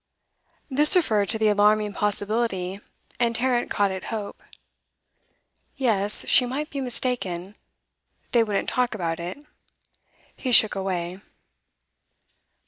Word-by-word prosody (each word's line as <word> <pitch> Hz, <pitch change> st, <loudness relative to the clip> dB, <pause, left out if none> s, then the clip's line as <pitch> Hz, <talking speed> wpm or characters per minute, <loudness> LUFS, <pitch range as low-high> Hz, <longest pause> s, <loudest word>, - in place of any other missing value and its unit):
This 300 Hz, +5 st, +5 dB
referred 215 Hz, -, +1 dB
to 225 Hz, -, +1 dB
the 220 Hz, -1 st, +2 dB
alarming 210 Hz, 0 st, +2 dB
possibility, 205 Hz, -2 st, -1 dB, 0.4 s
and 235 Hz, -1 st, 0 dB
Tarrant 245 Hz, 0 st, 0 dB
caught 200 Hz, -1 st, 0 dB
at 190 Hz, 0 st, -6 dB
hope. 215 Hz, -3 st, -6 dB, 1.4 s
Yes, 210 Hz, -6 st, +2 dB
she -, -, +6 dB
might 295 Hz, +5 st, -4 dB
be 280 Hz, -, -4 dB
mistaken; 220 Hz, -8 st, -2 dB, 0.8 s
they 235 Hz, -2 st, +4 dB
wouldn't 210 Hz, -3 st, -2 dB
talk 250 Hz, -2 st, -1 dB
about 165 Hz, -4 st, -3 dB
it; 175 Hz, +6 st, -6 dB, 1.0 s
he 255 Hz, -, -4 dB
shook 220 Hz, -2 st, +6 dB
it -, -, -3 dB
away. 185 Hz, -1 st, -4 dB
215 Hz, 120 wpm, -24 LUFS, 195-245 Hz, 1.4 s, she